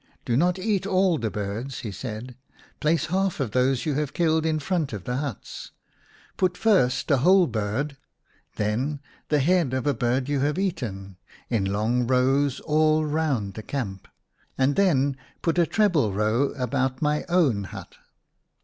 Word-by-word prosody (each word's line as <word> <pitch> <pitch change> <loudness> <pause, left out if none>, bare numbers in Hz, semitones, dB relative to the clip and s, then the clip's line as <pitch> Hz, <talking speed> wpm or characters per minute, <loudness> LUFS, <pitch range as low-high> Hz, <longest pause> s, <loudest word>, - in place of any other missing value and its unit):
" - - -39
Do 115 - 0
not 175 +7 +2
eat 195 -1 -1
all 185 -4 +2
the 110 - -1
birds/' 105 +6 -4
he 110 - -5
said. 120 +3 -7 0.2
" - - -28
Place 155 +1 +2
half 190 -2 0
of 130 -6 -1
those 130 +1 +1
you 155 - 0
have 150 0 -2
killed 160 -1 +2
in 155 -1 +1
front 155 -3 -1
of 100 -4 -5
the 125 +4 -2
huts. 140 -6 -6 0.6
Put 180 -1 +1
first 160 - +2
a 140 - +5
whole 185 +7 +5
bird, 120 +4 -2 0.6
then 125 +8 -1 0.3
the 150 - +3
head 155 -2 +2
of 130 - -2
a 145 - +2
bird 125 +2 0
you 145 -1 0
have 145 +4 0
eaten, 100 - -3 0.3
in 110 -5 +1
long 110 +5 0
rows 130 +2 +2
all 155 0 +2
round 145 -10 -1
the 110 - -7
camp, 105 -7 -5 0.5
and 135 +1 +2
then 140 -8 +2 0.3
put 165 +1 +1
a 170 - +4
treble 170 - +2
row 110 +6 +2
about 130 +1 -1
my 150 0 +1
own 140 - +2
hut." - - -9
135 Hz, 170 wpm, -25 LUFS, 120-160 Hz, 0.6 s, a